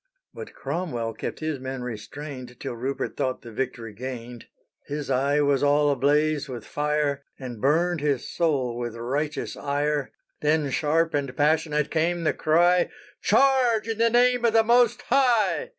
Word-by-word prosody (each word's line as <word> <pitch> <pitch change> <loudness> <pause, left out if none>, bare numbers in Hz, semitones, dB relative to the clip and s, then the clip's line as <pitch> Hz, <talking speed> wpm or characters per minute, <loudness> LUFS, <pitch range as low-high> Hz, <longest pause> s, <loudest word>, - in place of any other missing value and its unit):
But - - -9
Cromwell 120 -11 -3
kept 110 - -6
his 155 -3 -2
men 130 -1 -5
restrained 125 +2 -8
Till - - -5
Rupert 130 +4 -3
thought 130 +1 -2
the 120 - -9
victory 115 -2 -4
gained. 120 0 -7 0.4
His 145 -1 -4
eye 140 +3 +2
was 140 -2 +2
all 145 0 +3
ablaze 145 +2 +1
with 125 -2 -7
fire, 150 -1 -1
And 125 -5 -8
burned 165 +3 +2
his 140 -4 0
soul 135 -8 0
with 120 -1 -4
righteous 140 +6 -3
ire; 145 0 -1 0.3
Then 150 -2 +1
sharp 160 +3 +1
and 140 -3 -2
passionate 150 0 +1
came 170 +2 0
the 155 - +2
cry, 175 +3 +3 0.3
"_Charge, 255 -5 +3
in 225 -1 -3
the 230 0 +4
name 245 +1 +3
of 230 -2 +3
the 225 0 +5
Most 240 +1 +3
High! 250 - +2
145 Hz, 155 wpm, -25 LUFS, 130-170 Hz, 0.4 s, the